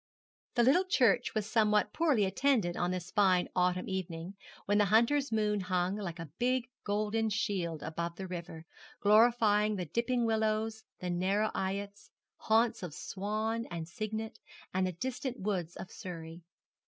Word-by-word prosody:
The 240 - +4
little 285 +10 +4
church 250 - +2
was 215 -2 0
somewhat 210 -2 +2
poorly 295 -11 +3
attended 205 -4 +1
on 175 - 0
this 180 -1 -4
fine 185 -3 +3
autumn 180 0 +1
evening, 180 -2 -4 0.3
when 205 +1 +2
the 205 - +5
hunter's 235 +7 +3
moon 210 -1 +1
hung 185 0 0
like 190 -5 -5
a 165 -4 -8
big 250 0 +1
golden 215 +2 0
shield 180 -7 -2
above 170 +1 -4
the 190 - -6
river, 170 -3 -7 0.3
glorifying 215 -1 +4
the 180 -3 -3
dipping 235 - 0
willows, 220 0 0 0.2
the 180 -1 -2
narrow 195 +5 +1
eyots, 200 +1 -4 0.3
haunts 225 +1 +2
of 175 -5 -6
swan 215 +4 -3
and 165 -2 -5
cygnet, 215 +4 -5 0.3
and 185 0 +1
the - - -2
distant 255 - -4
woodlands 185 -4 -2
of 190 - -8
Surrey. 165 -3 -8
205 Hz, 155 wpm, -32 LUFS, 180-225 Hz, 0.3 s, the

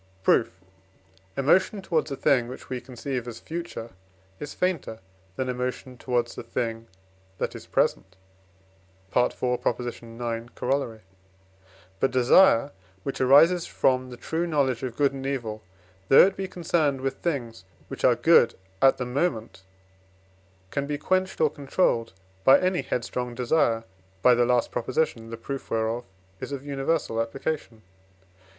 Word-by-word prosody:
Proof. - - +2 0.8
Emotion 185 +9 +3
towards 160 -5 0
a 140 - -3
thing, 125 -3 +2
which 125 - -10
we 125 -1 -3
conceive 125 -1 -5
as 115 -1 -7
future, 165 -9 -6 0.5
is 145 - -6
fainter 180 -11 -1 0.4
than 130 - -2
emotion 125 +1 -4
towards 120 -1 -1
a - - -3
thing 115 -1 -4 0.5
that - - -2
is - - -10
present 95 -1 0 1.0
(IV. 125 - +5
ix. - - -13
Coroll.). 120 0 -2 1.0
But 135 - +2
desire, 130 +2 +5 0.3
which 135 - -4
arises 165 +7 +5
from 130 -1 +1
the 125 - -9
true 165 +6 -2
knowledge 135 -7 +1
of 125 -3 -4
good 140 -1 +3
and 135 -1 -6
evil, 120 -6 -3 0.5
though 135 - +8
it 195 - -1
be 190 0 -4
concerned 160 -6 0
with 135 0 -2
things 120 - -3 0.2
which - - -8
are 125 - +5
good 140 -5 +5 0.3
at 135 0 +5
the 125 - -3
moment, 125 - -2 1.1
can 140 0 -2
be 145 0 -2
quenched 185 +5 0
or 155 -2 +3
controlled 135 - 0 0.3
by 135 - +7
any 185 0 +1
headstrong 125 0 -3
desire 120 -2 +1 0.4
(by 125 - +7
the 120 0 +3
last 125 -1 +1
Prop., - - -3
the 115 -5 -1
proof 135 +4 -6
whereof 115 +2 -1 0.3
is - - -6
of 140 0 -5
universal 140 -4 -1
application). 115 -1 -4
130 Hz, 140 wpm, -26 LUFS, 120-145 Hz, 1.1 s, though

